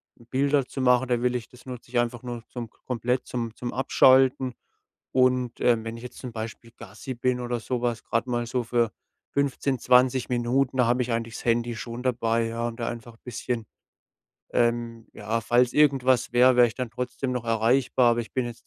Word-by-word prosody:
Bilder 135 +3 0
zu 135 - -6
machen, 125 0 +3
da 120 -1 +1
will 125 0 +1
ich 120 -2 -4
das 125 +1 -17
nutze 125 -2 -9
ich 120 - +2
einfach 120 +1 -2
nur 120 -2 -6
zum 120 -2 -7
komplett 125 +2 -3
zum 115 -2 -4
zum 120 -1 -5
Abschalten. 130 -1 +4 0.6
Und, 125 -1 +2
ähm, 115 -2 +3
wenn 115 +1 -5
ich 115 - -11
jetzt 125 - -9
zum 125 -2 -7
Beispiel 115 +1 -7
Gassi 130 - -8
bin 125 +1 0
oder 120 -1 -2
so 120 +1 -3
was, 120 -2 -1
gerade 115 +2 -1
mal 120 -1 -1
so 125 +1 -1
für 115 -1 +1 0.4
15, 140 -2 0
20 125 +1 +3
Minuten, 125 +2 0
da 125 - +4
habe 125 +1 +2
ich 120 - -4
eigentlich 115 0 -2
das - - -8
Handy 120 0 +1
schon 115 +2 -6
dabei, 115 -2 +1
ja, 115 +1 -2
und 115 0 -7
da 115 - -2
einfach 115 -1 -9
bisschen 120 -1 -4 0.9
ähm, 120 -1 0
ja, 115 +1 -2
falls 120 +3 +2
irgendwas 130 -5 +3
wäre, 125 +1 +6
wäre 125 - +7
ich - - -10
dann 125 -3 -4
trotzdem 125 +2 -3
noch 125 -2 -3
erreichbar, 120 +2 +3
aber 120 - 0
ich 115 - -8
bin 130 - 0
jetzt 120 -1 -9
120 Hz, 200 wpm, -26 LUFS, 115-125 Hz, 0.9 s, wäre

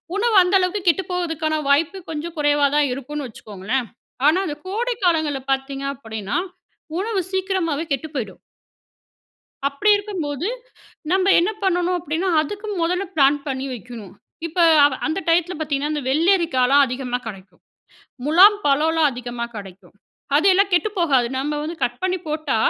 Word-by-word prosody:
உணவு 450 +2 +1
அந்த 360 +2 +1
அளவுக்கு 365 +2 0
கெட்டு 345 +3 +3
போவதுக்கான 325 -3 -1
வாய்ப்பு 320 +6 +2
கொஞ்சம் 320 +2 -5
குறைவா 290 -1 +3
தான் 295 -1 +3
இருக்குன்னு 280 +1 -5
வச்சிக்கோங்களேன். 215 +3 -4 0.4
ஆனா 315 +5 +5
அந்த 300 -5 -4
கோடை 475 +6 -1
காலங்கள்ல 315 -5 +1
பாத்தீங்க 270 +1 -2
அப்பன்னா, 220 - -5 0.6
உணவு 410 +2 -1
சீக்கிரமாவே 375 -5 -1
கெட்டு 275 +3 -1
போய்டும். 215 -8 -4 1.3
அப்படி 280 +9 0
இருக்கும்போது 350 -6 -4 0.6
நம்ப 375 +1 +2
என்ன 350 +5 +1
பண்ணணும் 360 -1 +1
அப்படின்னா, 330 +4 -2
அதுக்கு 405 +8 -6
முதல்ல 360 +3 0
பிளான் 285 0 +4
பண்ணி 265 -1 -3
வைக்கணும். 235 -5 -10 0.3
இப்போ 340 +2 -1 0.2
அ - - +7 0.2
அந்த 315 +5 -1
டயத்தில 340 +2 +2
பார்த்தீங்கன்னா, 295 -1 -1
அந்த 295 - -2
வெள்ளரிக்காலாம் 285 -4 +3
அதிகமா 250 0 -3
கிடைக்கும். 190 -4 -11 0.6
முலாம் 375 +8 +7
பழம்லா 315 +3 +2
அதிகமா 240 -1 -5
கிடைக்கும். 190 -2 -11 0.4
அதெல்லாம் 385 +4 +4
கெட்டுப்போகாது. 340 - +2
நம்ம 295 +2 -2
வந்து 325 +3 -4
கட் 245 0 -1
பண்ணி 370 0 0
போட்டா, 305 -5 -1
305 Hz, 135 wpm, -21 LUFS, 270-360 Hz, 1.3 s, அ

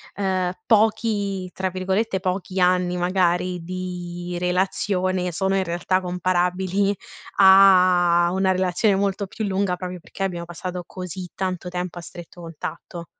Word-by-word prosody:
ehm, 185 -2 0 0.2
pochi 205 -4 +1
tra 190 +1 -2
virgolette, 190 +2 -1
"pochi" 185 0 -3
anni, 180 0 +2
magari, 180 -1 0
di 175 -1 -5
relazione 185 0 0
sono, 190 +4 0
in 190 - +1
realtà, 175 +1 0
comparabili 185 +2 0 0.4
a 185 -3 +6
una 190 0 +2
relazione 185 +2 +2
molto 200 +1 0
più 220 +3 -4
lunga, 190 -2 0
proprio 180 0 -6
perché 175 - -12
abbiamo 175 -3 -3
passato 180 +1 -6
così 180 0 -7
tanto 185 -1 -3
tempo 180 0 -4
a - - -5
stretto 175 +1 -11
contatto. 170 +1 -7
185 Hz, 130 wpm, -23 LUFS, 180-190 Hz, 0.4 s, a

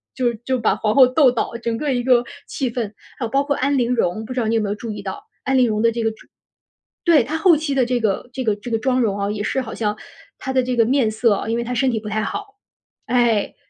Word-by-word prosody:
就 245 -2 +1
就 260 -1 +1
把 225 - +2
皇 215 0 -1
后 265 - +9
斗 260 +2 +4
倒， 240 - -2
整 230 -1 -2
个 285 +1 -1
一 245 -1 -1
个 245 -1 +4 0.2
气 255 -3 -2
氛。 225 -4 -3 0.2
还 250 - -2
有 - - -4
包 275 +4 +2
括 285 0 0
安 280 +2 +1
陵 245 -1 +1
容， 215 -2 0
不 255 - -6
知 255 - -2
道 225 - 0
你 230 - +1
有 225 - +2
没 205 - -2
有 205 - -1
注 225 +1 -6
意 210 -1 -6
到， 190 -1 -6 0.2
安 265 0 +1
陵 250 - +4
容 215 -1 0
的 230 0 +4
这 230 0 -3
个 225 - +1
妆 220 - -17 0.7
对， 330 -8 +5
她 300 +7 -4
后 335 -2 +5
期 295 -2 -2
的 265 -2 +3
这 245 0 0
个 220 +2 -1
这 260 +1 -4
个 215 -4 +1
这 210 +4 -9
个 225 - +1
妆 255 +2 +1
容 205 -4 0
啊， 200 0 -1
也 210 -1 -4
是 265 +5 -1
好 225 - -7
像 210 -1 -2 0.4
她 265 - -4
的 260 - +3
这 250 0 -2
个 230 -2 +4
面 255 -3 +2
色 220 0 +2
啊 200 - -3
因 230 - 0
为 235 - -1
她 250 +1 -4
身 265 +2 +2
体 225 -3 -1
不 210 0 -7
太 215 0 -1
好。 410 - -5 0.5
哎， 235 -4 +2
240 Hz, 310 characters per minute, -21 LUFS, 220-260 Hz, 0.7 s, 后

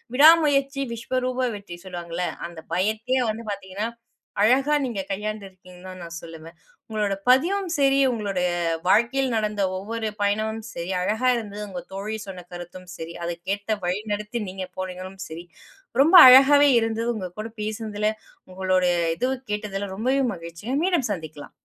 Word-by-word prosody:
"விடாமுயற்சி 285 -2 +5
விஸ்வரூப 255 +2 -1
வெற்றி" 200 -4 -9
சொல்லுவாங்கல்ல. 175 -1 -4 0.2
அந்த 170 -1 -11 0.2
பயத்தையே 220 +7 0
வந்து 225 +2 -8
பார்த்தீங்கன்னா, 200 +2 -4 0.5
அழகா 265 +7 +4
நீங்க 230 -6 -3
கையாண்டிருக்கீங்கன்னு 190 -3 -6
தான் 185 0 -9
நான் 170 0 -8
சொல்லுவேன். 165 0 -11 0.3
உங்களோட 210 -2 -1 0.2
பதிவும் 355 +9 +3
சரி, 275 -1 +3
உங்களுடைய 195 -5 -1 0.4
வாழ்க்கையில் 245 +5 +3
நடந்த 210 -2 -1 0.2
ஒவ்வொரு 220 +3 -3
பயணமும் 215 +2 0
சரி, 170 +2 -5
அழகா 220 +7 +1
இருந்தது. 210 -2 -6
உங்கள் 180 -2 -8
தோழி 210 +3 -4
சொன்ன 180 -2 -8
கருத்தும் 175 +1 -9
சரி, 165 +1 -7
அதுக்கேட்ட 195 +5 -3
வழி 180 +3 0
நடத்தி 210 +3 -4
நீங்க 185 0 -6
போனீங்களும் 185 +1 -6
சரி, 165 +2 -8 0.6
ரொம்ப 325 +5 +4
அழகாகவே 280 +3 +8
இருந்தது 225 +1 -1
உங்ககூட 215 +3 -6
பேசினதில, 215 -1 -2 0.4
உங்களுடைய 185 -1 +1 0.2
இதுவும் 260 +1 -2
கேட்டதில 200 -2 -3
ரொம்பவே 260 +5 +1
மகிழ்ச்சிங்க. 170 +9 -6
மீண்டும் 345 -10 +1
சந்திக்கலாம். 155 -5 -9
210 Hz, 135 wpm, -24 LUFS, 185-245 Hz, 0.6 s, அழகாகவே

